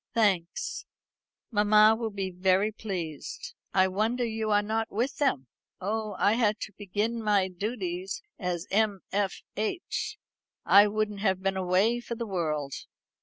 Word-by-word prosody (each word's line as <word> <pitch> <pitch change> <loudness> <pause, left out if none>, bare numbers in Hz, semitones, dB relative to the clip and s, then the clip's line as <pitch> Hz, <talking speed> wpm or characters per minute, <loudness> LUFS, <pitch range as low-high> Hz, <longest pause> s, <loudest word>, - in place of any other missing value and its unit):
"Thanks; 205 - 0 0.6
mamma 210 0 +6
will 225 0 -2
be 195 -2 -3
very 190 +3 +2
pleased. 195 - -5 0.2
I 190 0 +4
wonder 220 +6 0
you 220 -1 -2
are 205 0 +3
not 220 +1 -1
with 240 +6 -1
them." 205 - +1 0.3
"Oh, 210 +1 -2
I 205 - +4
had 220 -2 +2
to 210 - -5
begin 210 +4 -2
my 205 -3 +2
duties 185 - -4 0.2
as 180 -3 -2
M. 205 -1 +2
F. 200 -1 -1
H. 345 - -3 0.5
I 205 +1 +7
wouldn't 210 -1 -1
have 190 -2 0
been 195 0 +1
away 190 +6 +2
for 235 0 -5
the 235 0 -4
world." 155 -8 -2
205 Hz, 145 wpm, -28 LUFS, 190-220 Hz, 0.6 s, I